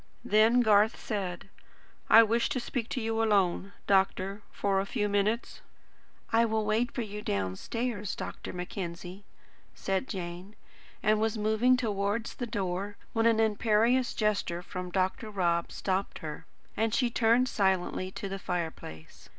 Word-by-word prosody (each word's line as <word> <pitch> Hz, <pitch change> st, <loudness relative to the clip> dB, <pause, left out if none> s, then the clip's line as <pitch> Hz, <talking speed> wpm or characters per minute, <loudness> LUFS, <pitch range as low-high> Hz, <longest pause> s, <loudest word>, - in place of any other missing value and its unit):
Then 220 Hz, +4 st, +5 dB
Garth 215 Hz, -1 st, +4 dB
said: 190 Hz, -5 st, -4 dB, 0.6 s
"I 225 Hz, -, +9 dB
wish 230 Hz, +2 st, +1 dB
to 255 Hz, -, -1 dB
speak 240 Hz, -1 st, -4 dB
to 255 Hz, -, -2 dB
you 225 Hz, -1 st, -1 dB
alone, 200 Hz, -3 st, +2 dB
doctor, 195 Hz, +1 st, +1 dB
for 195 Hz, -1 st, 0 dB
a 195 Hz, -, -1 dB
few 210 Hz, -3 st, -1 dB
minutes." 205 Hz, +3 st, -1 dB, 0.7 s
"I 230 Hz, +1 st, +5 dB
will 220 Hz, -1 st, 0 dB
wait 225 Hz, +5 st, +1 dB
for 245 Hz, -, -3 dB
you 210 Hz, -1 st, -6 dB
downstairs, 200 Hz, -, -3 dB
Dr. -, -, -6 dB
Mackenzie," 180 Hz, +1 st, -6 dB, 0.5 s
said 195 Hz, +6 st, -2 dB
Jane, 180 Hz, +1 st, -6 dB, 0.5 s
and 215 Hz, 0 st, +3 dB
was 220 Hz, 0 st, 0 dB
moving 220 Hz, +4 st, +3 dB
towards 210 Hz, -1 st, -1 dB
the 245 Hz, -, -5 dB
door, 200 Hz, -1 st, -3 dB, 0.2 s
when 225 Hz, 0 st, +3 dB
an 225 Hz, -1 st, +3 dB
imperious 225 Hz, +3 st, +2 dB
gesture 200 Hz, -5 st, 0 dB
from 180 Hz, 0 st, -6 dB
Dr. 190 Hz, +6 st, -1 dB
Rob 170 Hz, -4 st, 0 dB
stopped 190 Hz, 0 st, -2 dB
her, 155 Hz, +1 st, -7 dB, 0.3 s
and 220 Hz, 0 st, +1 dB
she 245 Hz, -3 st, +1 dB
turned 235 Hz, +2 st, +3 dB
silently 190 Hz, -4 st, 0 dB
to 195 Hz, -, -6 dB
the 195 Hz, 0 st, -5 dB
fireplace. 165 Hz, -, -6 dB
210 Hz, 145 wpm, -29 LUFS, 190-225 Hz, 0.7 s, I